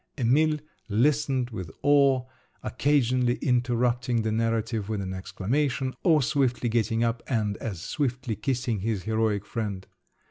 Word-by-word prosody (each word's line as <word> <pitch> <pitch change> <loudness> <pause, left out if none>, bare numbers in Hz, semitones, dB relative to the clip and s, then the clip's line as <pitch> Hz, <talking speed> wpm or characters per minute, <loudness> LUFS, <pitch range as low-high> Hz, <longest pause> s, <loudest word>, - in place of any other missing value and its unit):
Emil 150 +5 +3 0.3
listened 130 +2 +1
with 95 -7 -6
awe, 140 -3 +4 0.4
occasionally 125 -4 +2
interrupting 125 -2 +1
the 110 - 0
narrative 115 -1 -1
with 110 -2 -1
an 95 -1 -4
exclamation, 130 +8 -1
or 155 -5 +4
swiftly 125 -3 +1
getting 115 0 +1
up 115 0 0
and 105 -5 0
as 100 -7 -5
swiftly 130 -5 -2
kissing 120 0 -1
his 105 -1 -2
heroic 110 -2 0
friend. 100 -4 -4
120 Hz, 130 wpm, -26 LUFS, 110-130 Hz, 0.4 s, awe